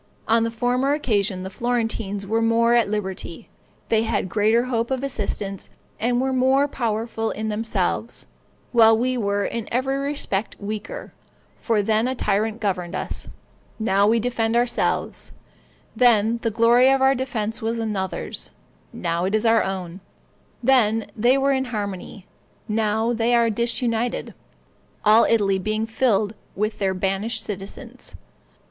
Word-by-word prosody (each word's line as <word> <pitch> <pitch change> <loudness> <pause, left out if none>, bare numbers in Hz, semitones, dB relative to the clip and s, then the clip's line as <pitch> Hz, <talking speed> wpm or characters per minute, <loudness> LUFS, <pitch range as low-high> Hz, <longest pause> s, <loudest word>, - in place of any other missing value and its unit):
On 225 0 +4
a 230 - 0
former 245 +4 0
occasion 205 -9 0
the 190 - -6
Florentines 225 -3 -2
were 225 +3 0
more 230 +1 +3
at 235 -4 +3
liberty; 190 -5 -5 0.4
they 220 -1 +3
had 220 -4 -1
greater 220 +4 +3
hope 235 -2 -1
of 265 0 -2
assistance, 200 -6 -3 0.3
and 240 +2 +1
were 265 +1 0
more 265 +2 +3
powerful 225 -3 -2
in 220 +1 -3
themselves, 215 0 -2 0.5
while 225 -2 +6
we 255 +2 0
were 205 -3 0
in 230 -2 -4
every 265 +3 0
respect 275 -8 -2
weaker; 215 - -6 0.4
for 220 -3 0
then 220 +3 +2
a 260 - -1
tyrant 215 0 0
governed 185 -4 -2
us, - - -5 0.5
now 200 -2 +2
we 230 +2 +3
defend 230 -1 0
ourselves; 240 0 0 0.6
then 230 -1 +4
the 230 - 0
glory 235 +4 +5
of 270 0 +3
our 265 0 +4
defense 235 -4 -3
was 225 +1 -1
another's, 210 -4 -3 0.4
now 170 +1 -2
it 195 +3 0
is 215 +2 0
our 225 0 +5
own; 185 -2 -4 0.6
then 225 -4 +3
they 240 +4 +3
were 275 +1 +2
in 265 -1 +1
harmony, 205 -4 -5 0.4
now 220 +1 0
they 235 +1 +2
are 230 -1 +3
disunited, 235 +1 -1 0.7
all 215 +2 +6
Italy 200 -4 +2
being 215 +3 -1
filled 220 -3 +1 0.2
with 215 +2 -2
their 190 -2 0
banished 195 +4 -1
citizens. 195 -1 -6
225 Hz, 145 wpm, -23 LUFS, 205-240 Hz, 0.7 s, while